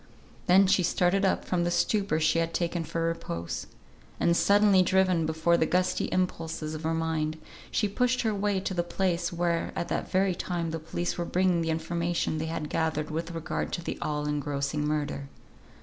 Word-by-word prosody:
Then 190 +2 +6
she 195 0 +3
started 180 +2 +2
up 190 - +1
from 175 -2 0
the 175 - +1
stupor 195 -2 +1
she 155 +1 +2
had 165 0 -1
taken 170 -1 -1
for 165 +1 -3
repose; 85 - -3 0.5
and 170 - +3
suddenly 200 0 +5
driven 185 -3 +2
before 160 +2 +2
the 160 - +2
gusty 180 0 +1
impulses 165 -4 -2
of 155 - -5
her 160 0 -1
mind, 160 -1 -1 0.3
she 210 - +1
pushed 250 +5 +1
her 220 -2 +1
way 200 -1 0
to 190 - -3
the 175 - +1
place 175 0 -1
where 170 -1 0
at 170 - -3
that - - -2
very 190 0 +2
time 170 -2 -3
the 165 - -3
police 170 +3 -3
were - - +1
bringing 180 -1 +2
the 165 - -1
information 165 0 -1
they 160 - -2
had 160 -2 -3
gathered 155 -1 -1
with 165 +2 -3
regard 165 0 -3
to 175 - -3
the - - -4
all 150 -1 -2
engrossing 145 0 -1
murder. 145 -2 -2
170 Hz, 190 wpm, -28 LUFS, 160-185 Hz, 0.5 s, Then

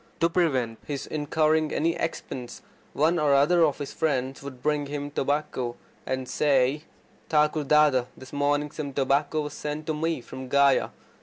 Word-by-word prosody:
To 165 - +3
prevent 130 -10 +1
his 140 -2 -4
incurring 155 +1 +1
any 165 +2 +1
expense, 130 -6 -5 0.3
one 165 +4 +2
or 145 -2 +3
other 165 +5 +4
of 150 -3 +2
his 145 -2 -6
friends 135 -4 -1
would 130 -3 -9
bring 150 -1 0
him 145 0 -4
tobacco, 140 -4 -1 0.3
and 130 -1 -2
say: 140 +1 +2 0.4
"Thakur 150 -1 +2
Dada, 150 -4 +4
this 130 +1 -13
morning 145 +1 0
some 145 -3 -5
tobacco 140 +3 +1
was 150 0 -5
sent 150 +1 -5
to 155 - -1
me 160 +1 -1
from 130 +2 -9
Gaya. 140 0 +4
145 Hz, 160 wpm, -26 LUFS, 135-155 Hz, 0.4 s, other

